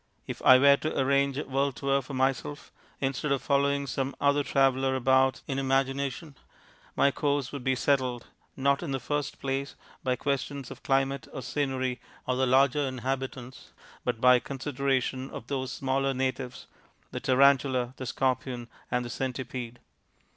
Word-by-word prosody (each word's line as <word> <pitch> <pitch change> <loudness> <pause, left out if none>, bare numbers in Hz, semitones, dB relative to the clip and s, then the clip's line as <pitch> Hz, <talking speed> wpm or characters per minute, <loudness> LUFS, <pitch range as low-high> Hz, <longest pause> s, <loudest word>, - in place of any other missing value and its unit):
If - - -6
I 130 - +8
were 140 +1 +6
to 155 - -3
arrange 140 0 +2
a 150 - -1
world 135 0 -1
tour 140 +1 +1
for 135 +1 -8
myself, 135 +2 -1 0.3
instead 135 +2 -1
of 140 - 0
following 140 0 +2
some 135 +1 -3
other 145 0 +3
traveller 135 0 +2
about 130 +1 +3
in 135 -1 -2
imagination, 135 +2 -1 0.6
my 140 - +4
course 140 -1 -1
would 140 -3 -6
be 130 0 +2
settled, 130 -3 0 0.3
not, 140 +1 +2
in 155 -6 -3
the 135 - -1
first 145 +3 -3
place, 135 +1 -3 0.3
by 130 -1 +1
questions 140 0 -3
of - - -10
climate 135 -2 0
or 130 - -6
scenery 130 -3 -2 0.2
or 130 - 0
the 130 +1 +1
larger 135 +3 +4
inhabitants, 130 -1 -4 0.3
but 120 -2 -1
by 125 0 +6
consideration 135 0 -2
of - - -8
those 130 -1 -3
smaller 135 +2 0
natives 130 -1 -3 0.5
the - - -4
Tarantula, 130 -1 +3
the 130 - -5
Scorpion, 125 -2 -1 0.2
and 125 0 0
the - - -6
Centipede. 125 -2 -4
135 Hz, 155 wpm, -28 LUFS, 130-140 Hz, 0.6 s, I